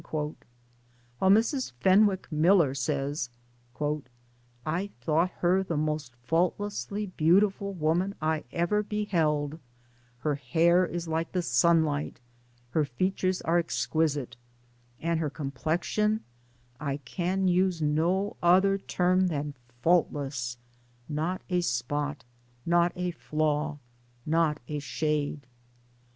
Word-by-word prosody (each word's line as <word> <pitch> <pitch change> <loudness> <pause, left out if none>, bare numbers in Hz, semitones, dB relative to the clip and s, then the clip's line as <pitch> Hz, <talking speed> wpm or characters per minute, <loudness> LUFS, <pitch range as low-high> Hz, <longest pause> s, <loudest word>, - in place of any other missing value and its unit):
While 150 -1 -2 0.9
Mrs. 220 - +3
Fen 190 - +6
wick 190 -2 -3
Miller 160 -2 +4
says: 140 -1 -2 1.4
"I 175 +6 -1
thought 160 +8 +2
her 180 +2 +3
the 170 -5 -2
most 150 -4 -2
faultlessly 180 - -1
beautiful 195 +4 +3
woman 175 +5 0
I 155 0 0
ever 175 +5 +1
beheld; 165 -8 0 0.6
her 150 +3 +1
hair 165 +7 +3
is 175 0 -4
like 160 +1 -2
the 180 -1 0
sunlight, 155 +2 +2 0.5
her 155 - +2
features 185 +7 -1
are 170 +2 +3
exquisite, 155 -6 -1 0.6
and 165 0 0
her 155 -2 -1
complexion 165 +10 -1 0.6
I 140 -2 -2
can 180 +7 -1
use 180 -1 +2
no 165 +7 +1
other 190 +3 +4
term 185 0 +2
than 145 -3 -2 0.3
faultless 140 -7 +1 0.5
not 160 +5 -2
a 180 -1 +1
spot, 145 +1 -2 0.4
not 170 0 +3
a 180 0 -2
flaw, 155 -2 -1 0.5
not 160 -1 +1
a 150 -1 -3
shade." 150 -1 -2
165 Hz, 110 wpm, -28 LUFS, 150-185 Hz, 1.4 s, Fen